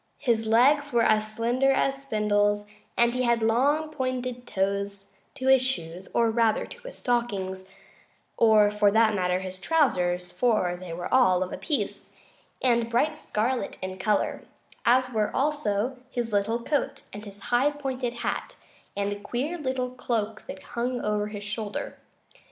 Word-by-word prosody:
His 225 -3 0
legs 280 +6 +4
were 235 -1 +3
as 215 -1 +2
slender 240 +5 +2
as 270 0 +1
spindles, 205 -4 +1 0.3
and 235 0 +4
he 255 - -1
had 235 -2 +2
long 285 +8 +2
pointed 255 -3 -3
toes 200 +1 -2 0.2
to 260 -2 -6
his 265 -1 +6
shoes, 185 -8 -3
or 230 -1 +2
rather 225 -1 +2
to 485 +1 -12
his - - -9
stockings, 195 -6 -2 0.7
or, 215 -2 +5
for 210 -1 +3
that 220 +1 +4
matter, 180 -2 +1
to 185 - -5
his 185 0 -6
trousers, 180 - +1
for 215 -8 +1
they 180 -1 -9
were 175 +6 -5
all 185 -8 +5
of 185 - -6
a - - -4
piece, 300 -4 -2 0.5
and 235 -2 +2
bright 300 +6 +1
scarlet 240 0 -2
in 185 0 -6
color, 210 +2 0 0.5
as 255 +1 +4
were 215 -3 +1
also 260 -4 0
his 240 -4 -3
little 225 +4 0
coat 290 +2 -1
and 205 +1 -7
his 200 -1 -10 0.2
high 255 +4 +4
pointed 265 -4 -4
hat - - -3 0.4
and 200 0 0
a 205 - -8
queer 250 +10 -3
little 260 -3 -2
cloak 225 -4 -3
that 190 0 -8
hung 245 +1 -1
over 210 0 0
his 205 -1 -7
shoulder. 210 0 -4
230 Hz, 165 wpm, -26 LUFS, 205-255 Hz, 0.7 s, his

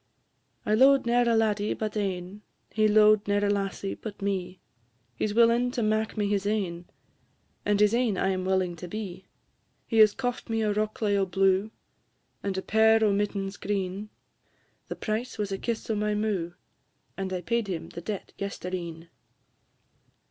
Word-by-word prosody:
I 210 - +1
lo'ed 270 +4 +5
ne'er 240 0 +3
a 230 - +3
laddie 210 -2 +1
but 215 -1 -4
ane, 195 -1 -3 0.3
He 215 0 +3
lo'ed 215 0 +5
ne'er 205 0 +2
a 205 - +2
lassie 195 -1 -2
but 210 -2 -8
me; 190 -2 -3 0.6
He 115 - -1
's 205 - -4
willing 235 +1 +4
to 240 - -1
mak' 215 +1 0
me 205 -1 +1
his 200 -1 0
ain, 180 -5 -2 0.8
And 205 -1 +2
his 210 +1 +4
ain 235 -5 +1
I 190 - +1
am 185 -1 -1
willing 185 -2 0
to 180 - -7
be. 190 -1 -6 0.6
He 225 - -2
has 215 -1 +7
coft 245 -2 -3
me 225 -1 0
a 210 -1 +1
rokelay 215 0 0
o' 195 -1 +1
blue, 190 +2 +2 0.7
And 195 -1 -3
a 190 - -2
pair 220 +1 +4
o' 210 -2 +3
mittens 200 -1 -2
o' - - -29
green; 195 +1 -3 0.8
The - - -5
price 225 +3 -3
was 205 -2 -2
a 195 - -3
kiss 230 -2 -3
o' 225 - 0
my 210 0 0
mou', 200 -5 -1 0.6
And 190 -1 -4
I 180 -1 -2
paid 235 +3 -1
him 180 -4 -4
the 170 - -8
debt 205 +2 -6
yestreen. 175 -4 -5
205 Hz, 175 wpm, -27 LUFS, 190-220 Hz, 0.8 s, has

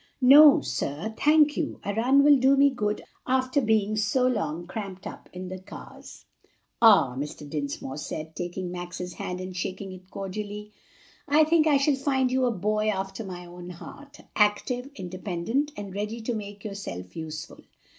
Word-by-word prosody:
"No, 285 +3 +9
sir, 145 - -3
thank 300 +1 +4
you; 315 - -3
a 205 - -1
run 255 +6 +4
will 290 -1 +7
do 270 +2 +4
me 280 0 +5
good 210 -5 -2 0.2
after 260 +2 +1
being 215 -2 +1
so 215 +4 +1
long 175 -9 -1
cramped 195 0 -7
up - - -9
in 180 0 -7
the 185 0 -6
cars." 190 - -12 0.6
"Ah," 195 - +6
Mr. 145 +2 -6
Dinsmore 140 -2 -4
said, 155 +2 -6
taking 175 +1 -4
Max's 180 0 -6
hand 180 +1 -5
and 185 0 -7
shaking 190 +2 -4
it 185 0 -12
cordially, 210 +2 -6 0.6
"I 300 +2 +5
think 315 0 +3
I 290 -2 +5
shall 280 +2 +2
find 265 -2 0
you 260 0 +2
a 245 - +2
boy 215 +1 0
after 195 +1 -3
my 180 -3 -8
own 175 0 -10
heart 280 - -11
active, 245 +5 +1
independent, 185 - -2
and 200 -2 -7
ready 210 +3 -4
to 235 +2 -2
make 205 -2 -7
yourself 90 - -7
useful. 160 0 -7
205 Hz, 165 wpm, -26 LUFS, 180-255 Hz, 0.6 s, No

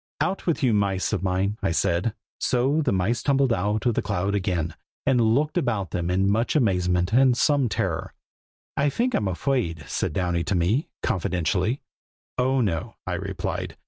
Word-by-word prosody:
"Out 190 0 -1
with 165 -4 +1
you, 125 -4 +4
mice 100 -1 +1
of 100 - 0
mine!" 95 +3 0
I 100 - +1
said. 90 +5 0 0.2
So 135 +5 +2
the 140 -5 +1
mice 95 +6 +1
tumbled 135 -3 +2
out 105 +2 -1
of 120 - +3
the - - 0
cloud 95 +3 -1
again, 90 -5 -1 0.3
and 125 -3 +3
looked 145 +10 +2
about 110 - -1
them 85 0 -2
in 95 +2 +2
much 110 +8 +1
amazement 90 -6 +2
and 130 0 +5
some 140 -4 +3
terror. - - -2 0.6
"I 145 +1 +2
fink 245 - 0
I'm 105 - +1
afraid!" 90 - -1
said - - -1
Downy 90 0 0
to 95 - 0
me, 95 - +1
confidentially. 95 - 0 0.6
"Oh, 130 +1 +2
no!" 85 -8 -2
I - - -2
replied. - - -4
105 Hz, 175 wpm, -25 LUFS, 90-130 Hz, 0.6 s, and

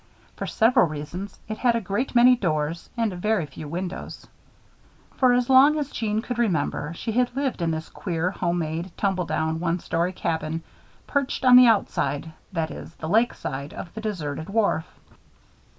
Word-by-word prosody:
For - - -5
several 225 -5 +4
reasons, 155 +6 -6
it 215 0 -5
had 240 -2 +3
a - - +2
great 225 +6 -2
many 245 +1 +7
doors 160 -6 -2
and 225 -4 0
very 190 0 0
few 145 +1 -9
windows. 180 +4 -5 0.9
For 255 -2 +5
as 245 0 +2
long 270 +4 +6
as 290 -2 -3
Jeanne 220 -1 -1
could 245 -2 -4
remember, 160 -7 0
she 225 - -4
had 245 +2 +1
lived 270 -8 -1
in 170 - +1
this 160 0 -3
queer, 175 -1 -2
home 175 -3 -1
made, 165 +2 -4
tumble 190 -3 0
down, 160 0 -1
one 170 0 0
story 170 +1 -1
cabin; 160 -2 -3 0.4
perched 280 -2 -1
on 250 -1 +8
the 250 0 +9
outside 160 -8 +1 0.2
that 165 -3 -2
is, 165 - -9
the 160 - -6
lake 225 +7 +3
side 140 +2 -5
of 170 - -8
the 220 - -6
deserted 160 -8 -4
wharf. 200 -6 +1
185 Hz, 175 wpm, -25 LUFS, 160-235 Hz, 0.9 s, the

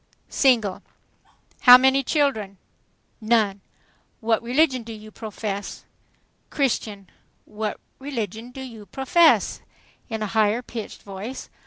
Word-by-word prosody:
"Single." 230 -8 +2 0.8
"How 250 -1 +10
many 265 +1 +3
children?" 250 -9 0 0.6
"None." 215 -3 +1 0.6
"What 225 -1 +1
religion 260 +2 +2
do 225 0 -9
you 215 0 -11
profess?" 210 -2 -6 0.6
"Christian." 220 -8 -2 0.4
"What 215 0 -4 0.2
religion 235 -4 -5
do 265 +2 -9
you 225 -5 -10
profess?" 320 +5 +3 0.5
in 220 -2 -3
a 210 - -5
higher 220 +2 +2
pitched 230 -3 -8
voice. 205 +6 -8
225 Hz, 110 wpm, -23 LUFS, 210-260 Hz, 0.8 s, How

